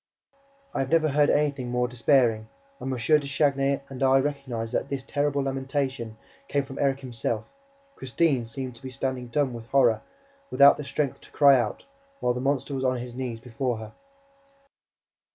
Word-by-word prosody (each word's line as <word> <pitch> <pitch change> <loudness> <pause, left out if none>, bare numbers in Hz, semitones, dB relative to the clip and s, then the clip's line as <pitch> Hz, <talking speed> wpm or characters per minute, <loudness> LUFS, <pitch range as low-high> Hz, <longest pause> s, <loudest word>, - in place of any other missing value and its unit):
I - - -2
have 135 -1 -1
never 160 0 +3
heard 145 +1 +3
anything 140 -4 +1
more 125 0 +1
despairing; 120 -2 +2 0.3
and 135 - -4
M. 130 - -2
de 145 +4 +2
Chagny 140 -1 +1
and 135 -1 -9
I 135 0 +5
recognized 130 -5 -3
that 140 - -1
this 135 -2 -3
terrible 145 0 0
lamentation 135 -4 -3 0.3
came 140 -1 0
from 135 0 -9
Erik 135 -1 +1
himself. 115 -3 -3 0.5
Christine 130 -1 0
seemed 125 +2 -6
to - - -18
be 130 - -7
standing 130 0 -3
dumb 135 +1 0
with 115 -1 -8
horror, 120 -5 +3 0.5
without 140 0 +7
the 150 - -5
strength 140 -1 -2
to - - -16
cry 140 -2 +6
out, 120 -4 -1 0.4
while 125 - +1
the 125 - -4
monster 140 +1 -1
was 135 -1 -2
on 130 -1 +1
his 120 0 -7
knees 125 -2 -4
before 125 0 -3
her. 110 0 -9
135 Hz, 175 wpm, -26 LUFS, 125-140 Hz, 0.5 s, without